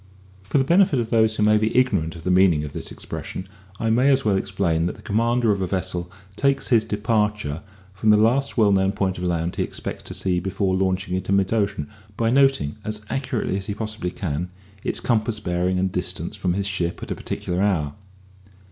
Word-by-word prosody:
For 100 +7 -1
the 135 - +4
benefit 170 0 +4
of 115 -1 -3
those 110 -2 +3
who 105 - +1
may 105 0 +5
be 110 +3 0
ignorant 100 -11 +2
of 80 - -10
the 90 - 0
meaning 90 -5 +4
of 75 - -6
this - - -4
expression, 95 - -6 0.3
I 115 -1 +1
may 125 +5 +4
as 135 -2 +3
well 105 -2 +3
explain 95 -4 0
that - - -4
the - - -15
commander 115 +2 +2
of 100 -1 0
a 95 - 0
vessel 90 -2 -3 0.2
takes 140 +4 +1
his 115 -3 +5
departure 105 -7 -1 0.3
from 95 +3 0
the 105 - +7
last 120 +7 +2
well 105 -3 +5
known 95 0 +2
point 95 -3 -1
of - - -5
land 85 -1 -1
he - - +1
expects - - -5
to - - -6
see 90 -2 0
before 95 +1 -1
launching 95 0 0
into 95 +1 -2
mid 100 +1 +2
ocean, 100 -9 0 0.3
by 115 0 +1
noting, 135 - +3
as 105 0 -4
accurately 125 -7 -1
as 95 - -7
he 100 - -3
possibly 110 -4 -3
can, 90 -1 -3 0.3
its - - -1
compass 110 -2 0
bearing 90 -1 0
and 95 0 0
distance - - -2
from 90 -1 -1
his 100 0 -1
ship 90 -4 -2
at - - -6
a - - -1
particular 90 +1 -3
hour. 85 -8 +1
100 Hz, 210 wpm, -23 LUFS, 90-110 Hz, 0.3 s, the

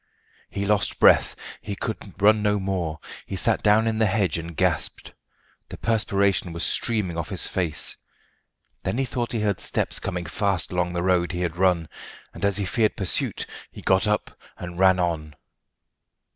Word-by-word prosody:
He 100 - -3
lost 105 0 +1
breath. - - +5 0.3
He 100 -2 -5
could 100 -2 -6
run 105 +1 +5
no 105 0 +1
more. 90 -5 -3 0.3
He 95 - -4
sat 110 +4 +1
down 105 +1 +4
in 110 -1 -1
the 110 - +3
hedge 95 -6 0
and 85 -1 -8
gasped. - - -1 0.6
The - - -8
perspiration 100 -5 0
was 85 0 -1
streaming 100 -8 +2
off 85 - -4
his 95 -5 +2
face. 90 -5 +1 0.9
Then 95 +5 -2
he 135 - +1
thought 120 -1 -3
he 115 - -1
heard 100 -3 0
steps - - -1
coming 90 -1 -4
fast 100 0 -1
along 90 0 -1
the 85 0 -2
road 90 -1 +1
he 90 - -3
had 85 -2 -2
run, 90 -3 +2 0.5
and 85 - -10
as 100 -1 +2
he 100 - 0
feared 110 +3 0
pursuit, 95 -4 -1 0.3
he - - -11
got 95 +2 +3
up 105 -1 -1 0.2
and 90 0 -8
ran 95 -1 +5
on. 80 -3 -2
95 Hz, 175 wpm, -24 LUFS, 90-105 Hz, 0.9 s, breath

